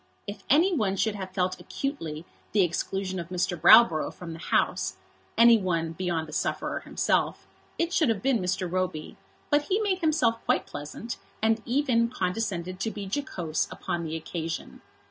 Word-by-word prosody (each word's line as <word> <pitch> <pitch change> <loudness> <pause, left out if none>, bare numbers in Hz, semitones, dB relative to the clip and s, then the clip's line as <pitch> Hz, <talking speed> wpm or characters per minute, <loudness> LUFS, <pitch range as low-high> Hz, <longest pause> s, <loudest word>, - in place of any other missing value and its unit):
If 205 0 -7
any 340 +7 +4
one 200 -8 +1
should 220 +2 +1
have 190 -2 -6
felt 185 -1 -1
acutely 165 - -4 0.3
the 205 -2 +5
exclusion 185 +2 -2
of 170 0 -6
Mr. 180 0 -1
Browborough 175 -1 +6
from 170 -2 -8
the 165 - -9
House, - - 0 0.4
any 235 -1 +7
one 165 -4 -1
beyond 165 -2 -2
the 155 - -10
sufferer - - -1
himself, - - 0 0.3
it 335 +1 0
should 310 -8 +3
have 225 -1 -1
been 265 -3 +3
Mr. 185 0 -1
Roby; 180 -3 -3 0.4
but 290 0 +3
he 395 +2 +1
made 400 -4 0
himself 280 -9 +1
quite - - +2
pleasant, 150 +11 -7 0.2
and 220 0 +2
even 240 -3 +2
condescended 185 -4 -2
to 225 - -1
be 210 -2 -6
jocose 190 - -2
upon 170 -1 -4
the 160 0 -4
occasion. 165 0 -5
190 Hz, 165 wpm, -27 LUFS, 170-235 Hz, 0.4 s, any